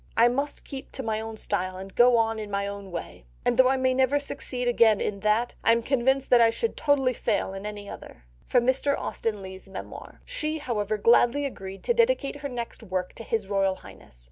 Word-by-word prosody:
I 235 +1 +6
must 280 +4 -3
keep 270 -1 -8
to 265 - -5
my 220 -1 -1
own 220 0 -7
style 185 -3 -2
and 190 0 -9
go 245 0 +5
on 225 -1 +1
in 210 -1 -6
my 200 0 -1
own 200 -1 -6
way; 170 - -7 0.2
and - - +2
though 260 +1 +6
I 265 - +2
may 260 0 +2
never 260 +2 +3
succeed 270 -3 -3
again 230 -3 +4
in 200 -1 -2
that, 215 +4 +1
I 230 - +5
am 230 0 0
convinced 265 +1 +1
that 245 -1 +7
I 230 - +6
should 450 - -2
totally 275 -4 +2
fail 190 - -1
in 195 +2 -6
any 205 -1 -7
other." - - -10 0.3
(Mr. 260 +3 +2
Austen 210 -3 -3
Leigh's 190 +1 -9
Memoir.) 195 - -9
She, 315 -11 -2
however, 215 -7 -2
gladly 240 +6 +4
agreed 195 -7 -7
to 475 - +2
dedicate 465 - +2
her 285 -1 -5
next 240 -2 -6
work 185 -4 -3
to - - -9
His 220 -2 -1
Royal 195 -1 +1
Highness. - - -13
230 Hz, 215 wpm, -26 LUFS, 200-265 Hz, 0.3 s, that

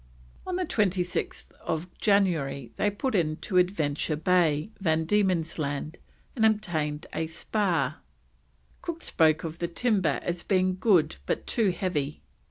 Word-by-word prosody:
On 365 -1 -1
26th 195 - -1 0.5
January 165 - +1
they 205 - +1
put 230 +6 -2
into 170 +1 0
Adventure 160 -5 +1
Bay, 160 +1 +2
Van 160 -4 +1
Diemen's 180 -4 +1
Land, 145 +2 -3 0.4
and 225 - 0
obtained 165 -9 +1
a 160 - -1
spar; 170 -4 0 0.8
Cook 335 -1 -5
spoke 160 -1 +3
of 165 0 -5
the 170 - -1
timber 185 - +1
as 175 0 -2
being 185 -1 +1
good 180 -7 +3
but - - -1
too 225 -5 +2
heavy. 160 -6 -2
175 Hz, 125 wpm, -27 LUFS, 155-200 Hz, 0.8 s, spoke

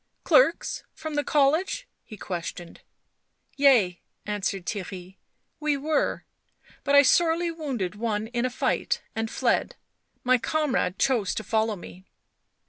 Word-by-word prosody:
" - - -48
Clerks - - +4
from 315 -1 -6
the 290 0 0
college?" 310 - +1 0.2
he 215 - -11
questioned. 175 -2 -6 0.4
" - - -51 0.3
Yea," 235 -11 +4 0.2
answered 195 -3 -2
Theirry. 190 -2 -6 0.2
" - - -49
We 290 -1 +3
were. 300 +2 -1 0.6
But 280 0 +2
I 285 - +9
sorely 335 +3 +3
wounded 270 - -3
one 215 0 -2
in 240 +1 -2
a 255 - +1
fight 245 - -1
and 225 0 -2
fied. - - 0 0.5
My 255 0 +4
comrade 265 -9 0
chose 230 -8 +1
to 220 - -3
follow 220 +1 0
me." 185 0 -12
235 Hz, 140 wpm, -26 LUFS, 200-290 Hz, 0.6 s, I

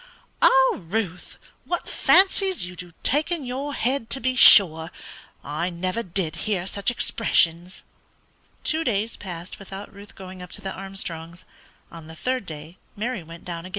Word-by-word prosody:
"Lord, 260 -10 +3
Ruth, 190 -5 -4 0.3
what 350 - -3
fancies 380 - +3
you 180 0 -9
do 175 0 -9
take 300 +5 +1
in 330 -6 -2
your 270 +3 -4
head, 245 -1 0
to 270 - +2
be 255 +1 0
sure! 160 -9 +8 0.5
I 155 +5 -3
never 185 +5 -3
did 180 -5 -2
hear 190 -5 -1
such 200 +3 -1
expressions!" 180 -7 0 0.8
Two 320 0 0
days 225 -3 -1
passed 175 -2 -8
without 195 +1 -9
Ruth 200 +1 -14
going 185 -1 -10
up 180 - -10
to - - -4
the 190 - -5
Armstrongs'; 180 -3 -6 0.5
on 165 -2 -11
the 160 - -11
third 255 0 -3
day 155 +3 -9 0.2
Mary 235 +3 -3
again 165 - -14
went 165 0 -12
down. 170 0 -6
195 Hz, 160 wpm, -23 LUFS, 170-245 Hz, 0.8 s, sure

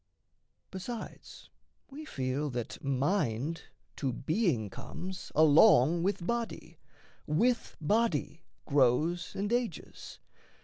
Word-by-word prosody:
Besides 220 +5 -8 0.4
we 305 +3 -8
feel 135 - -2
that 120 -3 -5
mind 140 - -1 0.3
to 135 -3 -1
being 140 - 0
comes 185 - -7
Along 155 - +6
with 190 -1 -1
body, 235 +2 -4 0.5
with 230 +11 +1
body 170 -3 0 0.2
grows 150 +6 +2
and 205 +3 -1
ages. 240 -9 -4
165 Hz, 90 wpm, -31 LUFS, 140-205 Hz, 0.5 s, Along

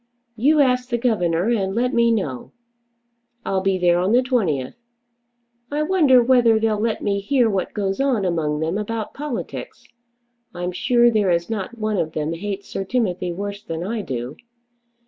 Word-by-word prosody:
You 290 +7 +3
ask 250 -2 +1
the 240 - 0
governor 200 -6 +1
and 195 -4 0
let 250 +3 0
me 235 0 +3
know. 155 - -3 0.9
I'll 190 -1 0
be 190 0 +1
there 175 -1 +3
on 185 +4 +1
the 250 +1 +4
20th. 175 - 0 1.0
I 295 +1 -1
wonder 305 -8 +4
whether 235 -3 +4
they'll 220 -1 0
let 225 0 -1
me 200 -1 0
hear 240 +4 +2
what 195 -4 -2
goes 195 0 -2
on 255 -8 +1
among 155 -4 -1
them 165 +6 -1
about 220 +1 -4
politics. 290 -4 -6 0.7
I'm 175 +1 -3
sure 240 +5 +3
there 210 -4 +2
is 170 +4 0
not 220 +2 -4
one 215 -2 -1
of 160 -3 -2
them 155 +1 -2
hates 200 +3 -5
Sir 195 - -4
Timothy 185 -5 -1
worse 200 +3 -5
than 165 -4 -5
I 220 +4 -3
do. 125 -5 -5
205 Hz, 170 wpm, -21 LUFS, 180-240 Hz, 1.0 s, the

